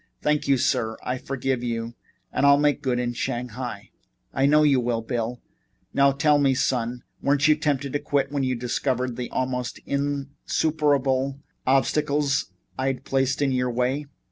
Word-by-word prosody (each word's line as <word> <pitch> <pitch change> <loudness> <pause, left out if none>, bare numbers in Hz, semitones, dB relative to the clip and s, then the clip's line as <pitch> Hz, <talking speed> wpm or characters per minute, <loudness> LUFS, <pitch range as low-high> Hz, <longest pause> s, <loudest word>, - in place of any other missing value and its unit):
"Thank 150 0 +1
you, 135 -1 +4
sir. 120 -4 0
I 125 0 -2
forgive 130 -1 -2
you 115 -1 -3 0.4
and - - 0
I'll 140 0 +7
make 145 0 +2
good 130 -4 0
in 120 0 -1
Shanghai." 120 -3 -4 0.4
"I 135 +1 +3
know 150 +1 +5
you 140 -3 +4
will, 120 -2 -1
Bill. 120 0 -3 0.5
Now, 140 0 +5
tell 145 +2 +3
me, 135 -2 +3
son, 125 -2 -1 0.2
weren't 140 +1 +3
you 155 - +6
tempted 145 -3 -1
to 145 - +1
quit 140 -2 0
when 145 -1 -1
you 130 -1 0
discovered 125 +1 -1
the 125 0 -4
almost 125 -1 -2
insuperable 140 -1 0 0.3
obstacles 140 -2 +1 0.3
I'd 135 0 -1
placed 135 +1 +1
in 135 - +2
your 125 -1 +1
way?" 125 +4 -1
135 Hz, 160 wpm, -25 LUFS, 125-140 Hz, 0.5 s, I'll